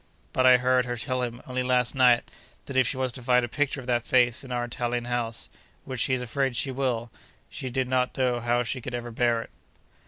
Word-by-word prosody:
But 130 0 +4
I 125 0 +8
heard 125 0 +2
her 120 -1 -3
tell 130 +2 -2
him, 120 0 -4
only 130 0 -2
last 125 -1 +2
night, 125 -3 +5 0.4
that 135 - -7
if 130 -2 +4
she 130 - -1
was 130 -1 0
to 125 - -8
find 125 0 +3
a - - -6
picture 140 +3 -1
of - - -12
that 120 -2 +1
face 120 0 +2
in 130 - -10
our 120 -1 -1
Italian 120 0 -2
house 120 -2 -2 0.4
(which 130 -2 -5
she 130 - +2
is 125 - -3
afraid 130 +2 -1
she 135 +3 0
will) 125 -3 -2 0.4
she 130 - -5
did 130 +1 -1
not 130 0 0
know 125 -2 +1
how 120 +1 +1
she 125 +3 -4
could 125 +1 -5
ever 120 0 -5
bear 115 0 +1
it. - - -17
125 Hz, 240 wpm, -26 LUFS, 120-130 Hz, 0.4 s, I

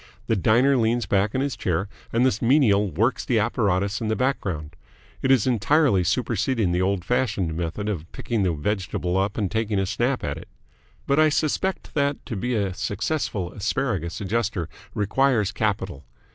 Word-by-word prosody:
The 115 - +1
diner 120 +8 +4
leans 115 0 +1
back 100 +2 +1
in 130 - +1
his 140 -3 -1
chair, 95 -2 -1 0.2
and 120 +2 +3
the 120 -4 +1
menial 115 -6 +4
works 110 - 0
the 120 - +1
apparatus 100 -2 0
in 110 - -2
the 110 - +1
background. 90 - -2 0.5
It 130 - 0
is 130 -6 +4
entirely 130 - +3
superseding 110 +1 0
the 90 +1 +1
old 95 -1 0
fashioned 100 -9 0
method 85 +5 -3
of 85 -6 -4
picking 115 -3 -2
the 95 -2 +2
vegetable 90 +2 -2
up 95 +2 0
and 100 -5 -1
taking 110 -1 0
a 95 - +1
snap 120 +6 -1
at 70 +2 -3
it. - - -12 0.6
But 140 +2 +2
I 155 0 +6
suspect 155 +6 -1
that 140 -1 0
to 115 - -5
be 125 +5 -1
a 100 -3 0
successful 100 - -2
Asparagus 100 - -2
Adjuster 105 -4 -1 0.3
requires 110 0 +2
capital. 95 -8 -2
105 Hz, 175 wpm, -24 LUFS, 95-125 Hz, 0.6 s, I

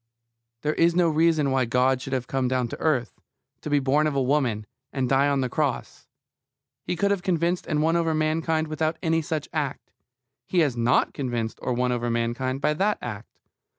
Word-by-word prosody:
There 150 +1 +1
is 170 +1 +3
no 175 -2 +4
reason 155 -2 +2
why 130 -1 +2
God 125 +2 +2
should 135 - -5
have 130 -2 -1
come 130 0 -1
down 125 -1 0
to - - -7
earth, 130 -7 0 0.4
to - - -5
be 145 - +3
born 145 +3 +2
of 150 - -2
a 135 - +2
woman, 125 -6 0 0.3
and 130 -2 -1
die 135 +2 +3
on 140 -1 +1
the 130 - 0
cross. 140 0 -3 0.7
He - - -3
could 200 +4 +1
have 200 -3 0
convinced 175 -1 0
and 150 -2 +1
won 165 +1 +2
over 165 -2 +1
mankind 155 +1 0
without 155 +1 -1
any 165 -1 +2
such 155 -1 -3
act. 145 -4 -3 0.6
He 180 - +2
has 145 -6 +1
not 120 +1 +2
convinced 120 -5 -3
or 125 - -1
won 125 +1 0
over 120 -1 -1
mankind 120 +3 -1
by 150 +1 +2
that 200 +7 +1
act. 110 -2 -7
145 Hz, 200 wpm, -25 LUFS, 125-160 Hz, 0.7 s, no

